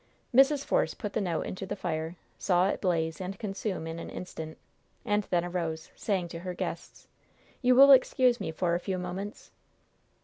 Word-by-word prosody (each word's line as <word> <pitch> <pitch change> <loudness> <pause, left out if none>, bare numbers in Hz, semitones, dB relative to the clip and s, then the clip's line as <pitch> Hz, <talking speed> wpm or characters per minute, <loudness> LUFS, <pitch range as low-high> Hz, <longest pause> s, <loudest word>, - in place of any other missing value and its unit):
Mrs. 275 +3 +5
Force - - +1
put 210 -3 -5
the 220 - 0
note 175 -5 -1
into 190 +1 -5
the 205 - -3
fire, 165 -3 -3 0.2
saw 180 0 +3
it - - -2
blaze 165 -3 0
and 185 +1 -5
consume 195 -4 -3
in 165 +1 -5
an - - -7
instant, 160 -3 -7 0.5
and 205 -1 +1
then 175 -1 +1
arose, 165 -3 -3
saying 190 -5 -1
to 165 - -6
her 180 +1 -5
guests: - - -6 0.5
"You 250 -1 +5
will 275 +2 +9
excuse 255 -2 +5
me - - -3
for 170 +1 0
a 175 - +1
few 190 0 -3
moments?" 185 +4 -6
185 Hz, 180 wpm, -29 LUFS, 170-210 Hz, 0.5 s, will